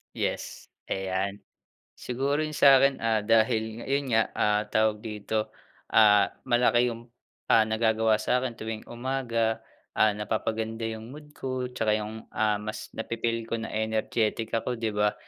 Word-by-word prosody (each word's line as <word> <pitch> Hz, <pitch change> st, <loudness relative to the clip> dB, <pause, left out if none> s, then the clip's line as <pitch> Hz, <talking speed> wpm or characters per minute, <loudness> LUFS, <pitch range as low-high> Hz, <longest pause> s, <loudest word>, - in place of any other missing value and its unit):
Yes, -, -, -4 dB, 0.2 s
ayan. 95 Hz, +1 st, -2 dB, 0.5 s
Siguro 135 Hz, +4 st, -1 dB
yung 155 Hz, -1 st, -3 dB
sakin, 135 Hz, 0 st, +6 dB
ah, 110 Hz, -2 st, +1 dB
dahil 110 Hz, +1 st, +1 dB
ayun 140 Hz, 0 st, -1 dB
nga, 115 Hz, 0 st, +5 dB
ah, 105 Hz, 0 st, +2 dB
tawag 110 Hz, -1 st, +1 dB
dito? 110 Hz, 0 st, -3 dB, 0.4 s
Ah, 105 Hz, -2 st, +6 dB
malaki 120 Hz, 0 st, +3 dB
yung, 115 Hz, +1 st, -8 dB, 0.4 s
ah, 110 Hz, -, +6 dB
nagagawa 110 Hz, 0 st, +2 dB
sakin 125 Hz, 0 st, -1 dB
tuwing 110 Hz, 0 st, -5 dB
umaga, 120 Hz, -3 st, -1 dB, 0.3 s
ah, 110 Hz, -1 st, +4 dB
napapaganda 110 Hz, +2 st, -3 dB
yung 110 Hz, +3 st, -7 dB
mood 150 Hz, 0 st, -12 dB
ko 130 Hz, -3 st, -4 dB
'tsaka 110 Hz, -3 st, +1 dB
yung, 110 Hz, +1 st, -7 dB
ah, 105 Hz, -1 st, +1 dB
mas 110 Hz, +1 st, -6 dB
napi-feel 115 Hz, 0 st, -3 dB
ko 115 Hz, -, -2 dB
na -, -, -5 dB
energetic 110 Hz, 0 st, -1 dB
ako 120 Hz, +2 st, -1 dB
'di 115 Hz, -2 st, -2 dB
ba? 105 Hz, 0 st, +1 dB
110 Hz, 140 wpm, -27 LUFS, 110-120 Hz, 0.5 s, sakin